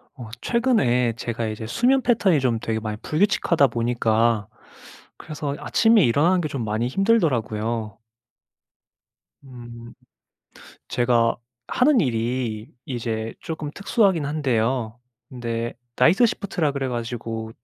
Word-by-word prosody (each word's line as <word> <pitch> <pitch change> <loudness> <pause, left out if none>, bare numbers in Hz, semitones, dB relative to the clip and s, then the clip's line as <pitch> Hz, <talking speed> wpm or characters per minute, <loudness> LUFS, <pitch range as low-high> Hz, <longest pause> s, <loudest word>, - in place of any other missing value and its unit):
어 120 -5 -9
최근에 130 - +2
제가 115 0 -4
이제 110 +1 -5
수면 250 - +2
패턴이 205 - +3
좀 120 -4 0
되게 110 0 -2
많이 110 -1 -5
불규칙하다 170 -3 +2
보니까 115 -2 +1 0.7
그래서 150 -2 -5
아침에 225 -3 +4
일어나는 155 +10 +3
게 155 - -2
좀 135 -5 -4
많이 110 +3 -1
힘들더라고요. 120 - 0 1.5
음 120 -3 -11 1.0
제가 120 -1 +2 0.3
하는 260 -1 +3
일이 115 -3 -2
이제 115 -3 -4
쪼금 160 -3 -5
특수하긴 200 -6 +1
한데요. 125 -5 -1 0.3
근데 120 -2 -4 0.2
night 165 - +5
shift라 190 -8 0
그래 135 -2 -2
가지고 115 -2 -4
125 Hz, 280 characters per minute, -23 LUFS, 115-160 Hz, 1.5 s, night